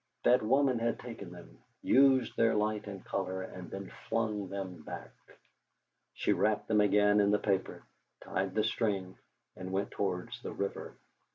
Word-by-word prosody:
That 125 - +5
woman 130 +2 +3
had 115 0 0
taken 115 -7 -8
them, - - -13 0.2
used 130 -3 +4
their 115 -1 +3
light 105 0 0
and 100 -2 -8
colour, 95 -1 -2
and 90 -1 -9
then 95 0 -7 0.2
flung 105 -4 -1
them 95 -3 -5
back! - - -8 1.0
She - - +2
wrapped 105 0 +1
them 105 -1 +4
again 105 0 +4
in 100 -1 +4
the 105 - +4
paper, 95 -2 -1 0.4
tied 95 0 -2
the 110 - +3
string, 100 -4 -1 0.4
and 95 0 -7
went 95 +1 -1
towards 90 -3 -3
the - - -6
river. 100 0 -4
105 Hz, 160 wpm, -32 LUFS, 95-110 Hz, 1.0 s, That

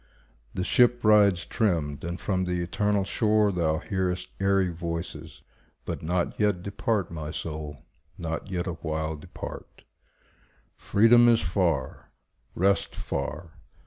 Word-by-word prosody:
The 90 - -1
ship 120 +3 +3
rides 100 -5 +5
trimmed, 80 -9 -1
and 85 +2 -4
from 95 -2 -1
the 90 0 -1
eternal 105 +3 0
shore 105 +1 +2
Thou 80 -4 +1
hearest 90 -1 -2
airy 95 -1 +2
voices; 85 0 -6 0.4
but - - -4
not 85 +2 -1
yet 105 -4 +1
Depart, 100 -2 -1
my 80 -2 -5
soul, 75 -3 -6 0.3
not 80 +2 -4
yet 90 -2 -2
awhile 80 -3 -3
depart. 75 - -9 0.9
Freedom 120 +3 +5
is 115 -1 +4
far, 85 -6 -1 0.5
rest 100 +3 +1
far. 80 +2 -5
90 Hz, 120 wpm, -27 LUFS, 80-100 Hz, 0.9 s, rides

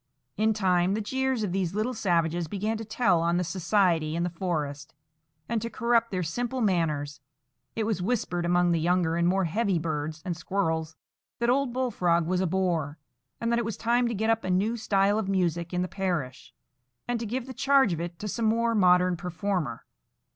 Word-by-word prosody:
In 220 0 +2
time, 185 -2 +2
the - - -1
jeers 265 +2 -1
of 200 - -1
these 185 -1 -1
little 220 +4 0
savages 170 -5 0
began 210 +6 -2
to 225 - -5
tell 215 -5 +2
on 170 +1 +1
the 180 - +1
society 175 -3 +1
in 170 - 0
the 175 - -1
forest, 150 -6 -3 0.5
and 230 -1 -1
to 230 - -3
corrupt 235 0 +1
their 185 -2 -2
simple 240 +10 -3
manners; 155 - 0 0.5
and 225 - -1
it - - 0
was 215 -4 -1
whispered 180 -4 -1
among 175 0 +2
the 165 - +2
younger 170 0 +1
and 170 0 +2
more 190 +1 +2
heavy 200 +2 0
birds 155 -1 -3
and 175 -2 -2
squirrels 160 -3 -2 0.4
that 235 0 +2
old 270 -1 +1
Bullfrog 180 -10 +1
was 180 +2 0
a 190 - +1
bore, 165 -5 -1 0.4
and 230 0 -1
that 235 - +2
it 235 - -2
was 225 -3 -4
time 240 +1 +2
to 235 - -2
get 220 +3 +1
up 225 0 0
a 185 - -3
new 200 +6 +1
style 205 -2 +2
of 200 -3 -3
music 175 -3 0
in 180 0 0
the - - -2
parish, 170 - -3 0.6
and 245 -1 -1
to 230 - -4
give 245 +3 -3
the 260 - -8
charge 275 -5 +3
of 165 - -3
it 170 0 -5
to 210 - -5
some 230 +3 -2
more 230 +1 +2
modern 180 -3 +4
performer. 175 -6 -3
185 Hz, 205 wpm, -27 LUFS, 170-225 Hz, 0.6 s, modern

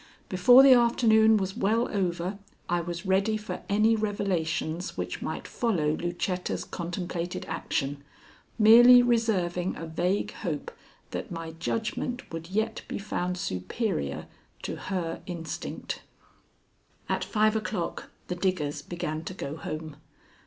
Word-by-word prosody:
Before 245 +8 +7
the 270 -1 +9
afternoon 220 -2 +5
was 190 -1 -2
well 225 +5 +1
over 185 0 -1 0.3
I 175 0 +1
was 170 +1 -5
ready 195 +3 +2
for 215 0 -6
any 215 +3 +4
revelations 180 -5 -2
which - - -4
might - - -4
follow 185 -11 0
Lucetta's 175 +3 -2
contemplated 175 0 -4
action, 140 0 -3 0.5
merely 240 +3 +9
reserving 190 -7 +1
a 165 - -6
vague 175 +5 -1
hope 160 -8 -4 0.4
that - - -4
my 165 -1 -5
judgment 225 +8 -3
would 165 +1 -6
yet 220 +3 -1
be - - -4
found 180 -3 -2
superior 95 - -2 0.4
to - - -3
her 175 -4 -3
instinct. 170 -3 -5 1.1
At - - 0
five 215 0 +2
o'clock 215 -5 -3 0.2
the - - -3
diggers 175 -6 -1
began 155 0 -4
to 185 - -6
go 140 -5 -5
home. 155 -1 -6
185 Hz, 125 wpm, -28 LUFS, 165-215 Hz, 1.1 s, the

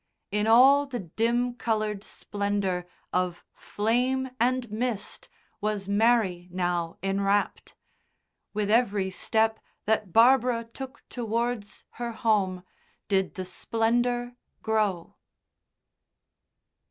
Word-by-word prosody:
In 210 +1 0
all 270 +5 +6
the 260 -3 -4
dim 235 +7 0
coloured 215 -4 -2
splendour 200 -5 -2 0.3
of 180 -1 -1
flame 250 +5 0
and 250 +1 +1
mist 220 -2 -3 0.3
was 210 -2 -2
Mary 200 -4 +2
now 175 -2 -1
enwrapped, 195 +1 0 0.8
with 210 0 -1
every 205 -5 +2
step 220 +3 +1 0.3
that 210 -3 0
Barbara 240 +2 +5
took 260 +4 -9
towards 230 -2 -3 0.2
her 235 -1 -2
home 200 -5 +1 0.5
did 190 -2 +1
the 185 - -4
splendour 240 +5 0 0.3
grow. 210 -6 -1
220 Hz, 95 wpm, -27 LUFS, 195-240 Hz, 0.8 s, all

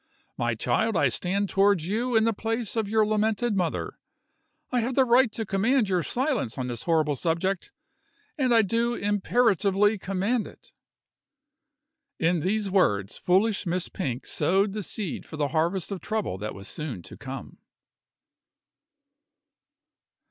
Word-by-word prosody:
My 120 -1 -1
child, 220 - +1
I 140 - +3
stand 195 - -1
towards 195 -4 +2
you 235 +5 -1
in 220 - +5
the 230 0 +2
place 225 +1 -3
of 220 -3 -1
your 220 0 +3
lamented 215 +1 +1
mother; 180 -4 -2 0.7
I 250 - +2
have 240 +2 -1
the 265 - +5
right 245 -1 +4
to 225 - -3
command 215 +4 +2
your 180 -2 +2
silence 250 - -1
on 130 - -2
this 120 -2 -5
horrible 155 -3 +2
subject, 170 +6 -1 0.6
and 260 -5 +1
I 230 -2 +6
do 230 +4 0
imperatively 205 -1 +2
command 195 +5 -1
it." - - -16 1.4
In 170 +1 +2
these 200 +4 -1
words 105 - +2
foolish 195 +2 +2
Miss 180 +1 -1
Pink 130 -9 -4
sowed 195 +6 +1
the 215 - -3
seed 200 -1 -4
for 155 - -10
the 145 -1 0
harvest 170 +4 0
of 195 - -4
trouble 215 - -2
that 105 +1 -5
was 100 0 -9
soon 130 - -6
to - - -11
come. 135 0 -8
195 Hz, 150 wpm, -26 LUFS, 165-225 Hz, 1.4 s, I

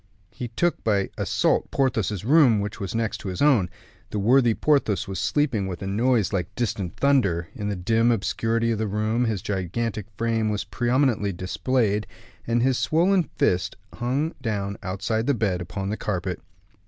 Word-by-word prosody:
He 125 - -5
took 165 +10 -1
by 100 -3 +1
assault - - +1
Porthos's 110 -7 0
room, 135 -5 +5
which 105 0 -4
was 100 +2 -4
next 115 -1 -1
to - - -7
his 90 -1 -4
own. 130 -12 +4 0.4
The - - -4
worthy 120 +2 +4
Porthos 115 -8 +1
was 95 -2 -4
sleeping 130 -6 +1
with 90 0 -5
a - - -3
noise 110 +2 +1
like 90 -3 -2
distant 105 -6 -2
thunder; 100 -13 +2
in 105 0 -4
the 100 - -1
dim 115 +6 +2
obscurity 115 +2 0
of 110 - -1
the 110 - 0
room 110 +4 0
his 110 -5 -2
gigantic 105 +2 -2
frame 115 -1 0
was 105 -1 -1
prominently 120 +2 +1
displayed, 105 +4 0 0.4
and 120 0 +2
his 130 -1 +2
swollen 170 +7 +2
fist 90 0 +1 0.2
hung 135 +7 -1
down 100 -5 -2
outside 100 +5 -2
the 140 - +3
bed 100 -5 0
upon 95 +3 -4
the 110 - -2
carpet. 90 -3 -3
110 Hz, 170 wpm, -24 LUFS, 100-120 Hz, 0.4 s, room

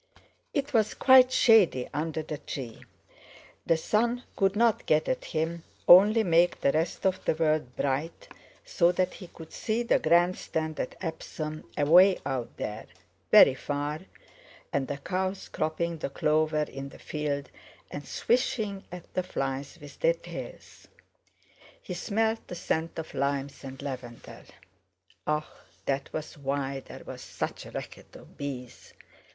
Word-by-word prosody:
It 285 -1 -2
was 220 -3 +2
quite 260 -1 +7
shady 210 - +5
under 155 +1 -2
the 150 -1 -6
tree; 125 -5 -7 0.8
the 165 - +4
sun 235 +8 0
could 195 0 +2
not 230 0 +2
get 155 0 +3
at - - -1
him, 165 +1 -2 0.3
only 205 +5 +8
make 175 -1 +3
the 140 - +3
rest 160 +5 -1
of 185 -1 +1
the - - +1
world 155 -5 0
bright 140 +4 -2 0.4
so 170 0 +3
that 185 0 0
he 185 - -10
could 160 -1 -13
see 225 +2 -1
the 235 - +3
Grand 175 +3 +3
Stand 155 -1 -3
at - - -3
Epsom 155 -2 -5
away 180 +6 +6
out 130 -4 -3
there, 105 +1 -5 0.4
very 130 - +8
far, 145 +2 -3 0.7
and 135 -2 0
the 145 - -3
cows 185 +5 -3
cropping 165 +1 -2
the - - -3
clover 155 +1 +1
in 135 -1 -7
the - - -13
field 145 -2 -3 0.4
and 145 - -7
swishing 220 -5 0
at 180 -1 -10
the 185 - +1
flies 135 -6 -4
with 145 -1 -12
their - - +3
tails. - - -10 0.9
He - - -7
smelled 225 +1 -1
the 180 - -6
scent 165 -1 -2
of 160 - -6
limes, 140 0 -2
and 135 -1 -8
lavender. 125 -4 -8 0.8
Ah! 150 0 0 0.4
that 135 0 -2
was 155 0 -6
why 135 0 -2
there - - -11
was - - -8
such - - -5
a - - -11
racket - - -8
of - - -14
bees. 130 -4 -7
160 Hz, 150 wpm, -28 LUFS, 140-185 Hz, 0.9 s, only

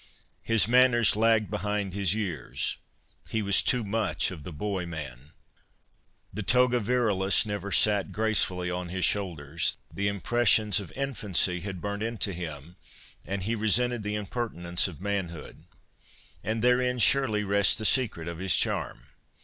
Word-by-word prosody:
His 115 -2 +2
manners 120 -3 +4
lagged 110 -1 +2
behind 105 -1 -2
his 100 -1 +1
years. 90 - -3 0.5
He 110 -1 -1
was 100 -1 +3
too 125 -2 +2
much 100 -6 -1
of 85 -5 -9
the 80 - -8
boy 95 +3 -4
man. 70 -5 -8 1.0
The 105 - -4
toga 125 +5 +3
virilis 105 -4 +1
never 100 -1 -5
sate 105 -2 +3
gracefully 95 -5 0
on 90 0 -4
his 95 +1 0
shoulders. 80 -5 0 0.2
The 100 +1 -1
impressions 105 +1 +2
of 95 -6 -9
infancy 105 -9 0
had 95 -1 -7
burnt 100 0 -4
into 110 -4 -2
him, 85 -1 -8 0.5
and 100 -1 -3
he 110 +4 -1
resented 115 +2 +1
the 105 0 -3
impertinence 100 -5 -2
of 90 -4 -10
manhood.' 95 -6 -5 0.8
And 110 +1 -2
therein, 125 0 +2
surely, 115 -2 +2
rests 100 0 +3
the 110 - -4
secret 105 -8 +2
of 85 -1 -6
his 95 -1 +2
charm. - - -1
100 Hz, 145 wpm, -27 LUFS, 90-110 Hz, 1.0 s, manners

